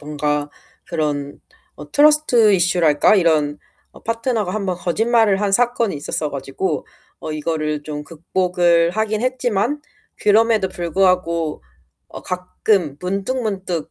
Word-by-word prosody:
뭔가 150 0 -2 0.4
그런 145 -4 -3 0.3
어 - - -12
트러스트 290 -7 +4
이슈랄까 175 -1 +3
이런 155 -5 +2 0.3
어 - - -16
파트너가 230 -4 -2
1 215 -2 -2
번 180 -2 -1
거짓말을 215 +2 +2
한 205 - 0
사건이 235 -3 +1
있었어 145 +1 -3
가지고 135 +6 -3 0.3
어 155 - -5
이거를 155 -1 -2
좀 150 0 -6
극복을 170 +1 +1
하긴 215 0 -1
했지만 255 +1 -1 0.4
그럼에도 215 -1 +3
불구하고 175 -2 0 0.5
어 - - -10
가끔 180 -3 -1
문득문득 195 - -3
180 Hz, 270 characters per minute, -20 LUFS, 155-215 Hz, 0.5 s, 트러스트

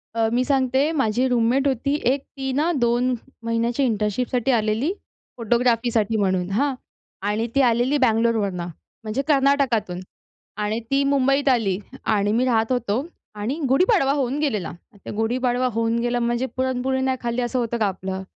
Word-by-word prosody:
अ, 225 -1 +2
मी 250 - +2
सांगते 270 +1 +2
माझी 260 -4 +1
रूममेट 250 +3 +2
होती 275 +2 0 0.2
एक. 275 0 -1 0.2
ती 270 0 -2
ना, 310 +6 +1
2 240 +2 +2 0.3
महिन्याची 230 +3 0
इंटर्नशिपसाठी 235 +3 0
आलेली 225 - +1 0.4
फोटोग्राफीसाठी 230 -1 +1
म्हणून 185 -2 0
हां. 270 +7 +1 0.5
आणि 215 +3 0
ती 275 - +5
आलेली 245 +3 +2
बंगलोरवरुन 225 -6 +1
म्हणजे 215 - -6
कर्नाटकातून 270 - +2 0.6
आणि 215 +2 -1
ती 275 +1 +3
मुंबईत 275 0 +2
आली 220 -7 +2 0.3
आणि 205 -1 +1
आम्ही 240 +4 +2
राहत 225 -1 +1
होतो. 245 +1 0 0.3
आणि 210 +7 -3
गुढीपाडवा 275 - +3
होऊन 275 -1 -1
गेलेला, 220 - -1 0.3
त्या - - -6
गुढीपाडवा 245 +3 0
होऊन 230 +1 0
गेला 240 +1 0
म्हणजे 240 +2 0
पुरणपोळी 260 0 0
नाही 260 0 0
खाल्ली, 235 +1 -1
असं 245 +1 -1
होतं 235 0 -1
का 220 - +1
आपलं? 190 0 -4
240 Hz, 150 wpm, -22 LUFS, 220-265 Hz, 0.6 s, ती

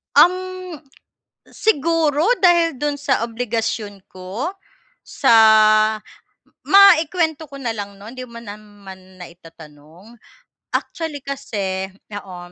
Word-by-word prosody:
Ang 355 - +7 1.2
siguro 320 -5 0 0.2
dahil 340 -5 +3
do'n 295 +2 -1
sa 285 -5 -1
obligasyon 225 -4 -4
ko, 195 - -6 0.5
sa 265 -5 +1 1.3
maikuwento 330 -5 +4
ko 275 - -10
na 245 -4 -3
lang 200 -2 -7
no'n 210 +4 -11
'di 255 -1 -8
mo 235 - -11
naman 205 -4 -13
na 180 - -9
itatanong, 165 +3 -16 0.6
actually 310 -4 -4
kasi 195 -9 -4 0.2
oo, 195 -3 -8
230 Hz, 100 wpm, -19 LUFS, 195-295 Hz, 1.3 s, Ang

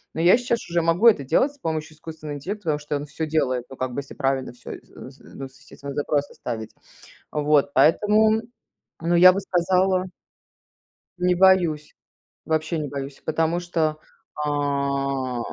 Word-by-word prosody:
Но 160 - -1
я 180 +7 +6
щас 240 -1 -1
уже 170 0 +1
могу 165 +7 +3
это 205 -11 +5
делать 170 - +1
с - - -22
помощью 160 - -4
искусственного 155 -1 -8
интеллекта, 200 +9 -6
потому 155 -2 +1
что 145 0 -4
он 145 - -6
всё 160 +2 -4
делает, 130 -6 0
ну - - -8
как 130 -1 -3
бы, 140 - -3
если 140 - -12
правильно 135 -1 -1
всё, 120 - -11
с - - -12 0.3
з - - -18
ну, 135 - -6
с 130 - -20
естественно 140 0 -10
запросы 145 0 -1
ставить. 110 -2 -5 0.6
Вот, 150 -1 +2
поэтому, 215 +6 +4 0.6
ну, 170 +1 0
я 180 +2 +9
бы 195 - -1
сказала 185 0 +1 1.1
не 180 0 +2
боюсь. 175 -5 +3 0.5
Вообще 160 +1 -1
не 150 - -3
боюсь, 140 0 -7
потому 160 +2 0
что, 165 -3 -1 0.4
а, 140 -3 -1
155 Hz, 165 wpm, -23 LUFS, 140-175 Hz, 1.1 s, я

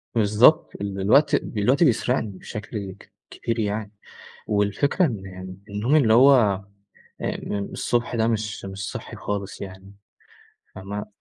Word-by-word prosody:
بالضبط، 110 +9 +4
ال 100 -1 -3
الوقت، 140 +9 +4
الوقت 125 +9 +1
بيسرقني 115 - +1
بشكل 105 -1 -6
ك - - -18 0.2
كبير 115 0 -3
يعني، 105 0 -2 0.6
والفكرة 105 - +1
إن 95 - -6
النوم 105 +8 +1
اللي 120 -8 +5
هو 115 -6 +5 0.6
أم - - -4 0.2
الصبح 120 0 -1
ده 110 -1 +2
مش 110 -3 -2
مش 95 +1 -5
صحي - - -7
خالص 100 -1 -4
يعني 95 0 -9 0.8
فاهمة؟ 100 +2 -6
105 Hz, 125 wpm, -24 LUFS, 100-120 Hz, 0.8 s, اللي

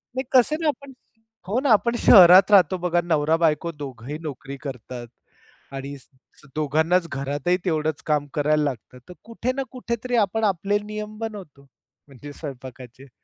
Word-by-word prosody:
नाही, 260 - -1
कसं 260 +4 +4
ना 320 - 0
आपण 280 -2 -3 0.6
हो 215 +6 0
ना 280 - 0
आपण 235 +3 +1
शहरात 185 0 +8
राहतो 185 -2 +5
बघा 175 0 +2
नवरा-बायको 160 +1 +1
दोघंही 140 -2 -8
नोकरी 140 -3 -7
करतात 125 -3 -8 0.7
आणि 135 +1 -6 0.6
दोघांनाच 160 +4 +1
घरातही 140 +6 -1
तेवढंच 155 -3 -1
काम 150 -1 0
करायला 150 +1 +1
लागतं. 125 -3 -5
तर - - -9
कुठे 230 +2 -3
ना 270 - -2
कुठेतरी 245 -1 -4
आपण 220 +3 -4
आपले 200 0 +1
नियम 215 0 -7
बनवतो, 195 -11 -8 0.4
म्हणजे 145 +1 -12
स्वयंपाकाचे. 130 -2 -10
160 Hz, 140 wpm, -23 LUFS, 140-210 Hz, 0.7 s, शहरात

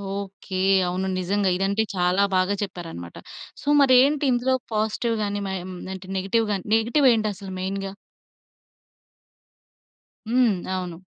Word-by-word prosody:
Okay. 200 -1 -7 0.3
అవును 185 +2 -2
నిజంగా. 195 +2 +1
ఇదంటే 200 +3 +1
చాలా 180 +2 +2
బాగా 185 +2 +2
చెప్పారన్నమాట. 165 - -7 0.4
సో - - -14
మరేంటి 275 +2 +5
ఇందులో 250 +2 +1 0.2
పాజిటివ్ 220 +2 0
గాని, 205 0 -2
ఆహ్, 180 -1 -4 0.3
అంటే 190 0 -9
నెగెటివ్‌ 205 +4 +1
గాని, 195 -3 -2
నెగెటివ్ 240 +6 +3
ఏంటసలు 205 -3 -3
మెయిన్‌గా? 195 +1 -3 2.4
హ్మ్. 240 -3 +3 0.2
అవును. 180 -2 -4
200 Hz, 115 wpm, -24 LUFS, 185-225 Hz, 2.4 s, మరేంటి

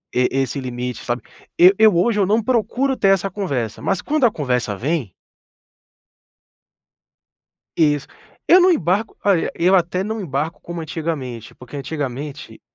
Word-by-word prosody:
e 125 0 +3
esse 135 +1 -1
limite, 125 -1 -5
sabe. 120 0 -2 0.4
Eu 180 +2 +8
eu 220 -4 +6
hoje 210 +4 +2
eu 195 - +3
não 215 +3 +2
procuro 255 +3 0
ter 195 - +3
essa 195 0 +2
conversa, 140 - -3
mas 195 - -1
quando 300 -3 +1
a 230 - +4
conversa 125 - -1
vem 135 - -2 2.6
Isso. 150 -3 +2 0.4
Eu 365 +2 +7
não 365 +1 +5
embarco 200 - 0
olha, 195 -5 +2
eu 180 +3 +2
até 180 +1 +1
não 220 +2 -4
embarco 155 -1 -3
como 170 0 -7
antigamente, 145 -8 -5
porque, 125 +2 -12
antigamente, 140 0 -6
165 Hz, 145 wpm, -20 LUFS, 130-200 Hz, 2.6 s, Eu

